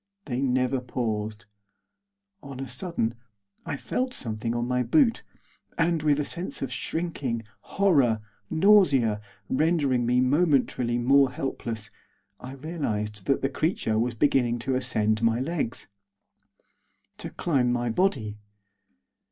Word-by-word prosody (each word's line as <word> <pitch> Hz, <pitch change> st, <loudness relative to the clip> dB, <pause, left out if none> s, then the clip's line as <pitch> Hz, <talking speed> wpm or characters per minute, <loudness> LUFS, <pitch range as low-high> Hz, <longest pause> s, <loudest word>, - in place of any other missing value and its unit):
They 125 Hz, -2 st, -2 dB
never 130 Hz, 0 st, +1 dB
paused. 110 Hz, -5 st, -3 dB, 1.0 s
On 135 Hz, -2 st, -9 dB
a 135 Hz, -, -4 dB
sudden 165 Hz, -12 st, -1 dB, 0.5 s
I 145 Hz, -, -2 dB
felt 255 Hz, -, -2 dB
something 115 Hz, 0 st, -2 dB
on 120 Hz, 0 st, -1 dB
my 125 Hz, 0 st, +1 dB
boot, 245 Hz, -, +3 dB, 0.6 s
and, 165 Hz, -1 st, +2 dB
with 150 Hz, -1 st, +2 dB
a 145 Hz, -, 0 dB
sense 170 Hz, -4 st, -4 dB
of 130 Hz, -2 st, -3 dB
shrinking, 140 Hz, -8 st, -3 dB, 0.3 s
horror, 140 Hz, -, +4 dB, 0.3 s
nausea, 145 Hz, -, +4 dB, 0.3 s
rendering 140 Hz, -5 st, +1 dB
me 125 Hz, +1 st, +3 dB
momentarily 130 Hz, -4 st, +2 dB
more 135 Hz, +3 st, +4 dB
helpless, 115 Hz, -5 st, -4 dB, 0.5 s
I 130 Hz, +1 st, -8 dB
realised 105 Hz, -, -4 dB
that 135 Hz, -, +1 dB
the 135 Hz, -, +2 dB
creature 135 Hz, -, 0 dB
was 120 Hz, +1 st, 0 dB
beginning 120 Hz, -2 st, +2 dB
to 135 Hz, -, 0 dB
ascend 110 Hz, -4 st, 0 dB
my 115 Hz, 0 st, +2 dB
legs, 140 Hz, -4 st, -3 dB, 1.3 s
to -, -, -5 dB
climb 130 Hz, -7 st, +1 dB
my 120 Hz, -1 st, 0 dB
body. 110 Hz, -, 0 dB
130 Hz, 125 wpm, -26 LUFS, 115-150 Hz, 1.3 s, horror